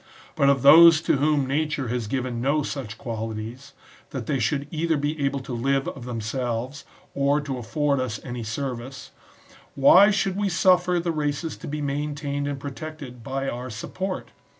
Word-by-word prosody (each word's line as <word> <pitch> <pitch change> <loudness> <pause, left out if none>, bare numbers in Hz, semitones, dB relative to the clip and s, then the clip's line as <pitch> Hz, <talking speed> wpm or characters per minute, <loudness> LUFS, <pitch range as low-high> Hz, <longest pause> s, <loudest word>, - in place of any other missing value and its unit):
But 140 - +4
of 140 -2 +2
those 165 +3 +9
to 145 - +1
whom 145 0 +2
nature 145 -1 -1
has 120 -2 -2
given 125 0 -2
no 145 +4 +1
such 125 -7 -5
qualities, 115 +2 -6 0.4
that 130 -4 -5
they 135 +3 -1
should 140 +5 0
either 160 0 0
be 145 +1 -2
able 140 0 0
to 130 - -7
live 135 +3 0
of 125 - -9
themselves, 120 +3 -3 0.3
or 140 +1 +2
to 135 -3 -4
afford 140 +4 0
us 125 -5 -3
any 120 -2 -5
service, 125 +2 -5 0.6
why 180 +9 +7
should 195 -2 0
we 200 0 0
suffer 180 0 +3
the 170 0 -1
races 150 +1 -2
to - - -9
be 150 0 -4
maintained 145 0 -2
and 140 -1 -3
protected 140 -2 -8
by 135 +2 -3
our 125 0 -4
sup 110 - -8
port 190 0 -4
140 Hz, 175 wpm, -24 LUFS, 125-150 Hz, 0.6 s, those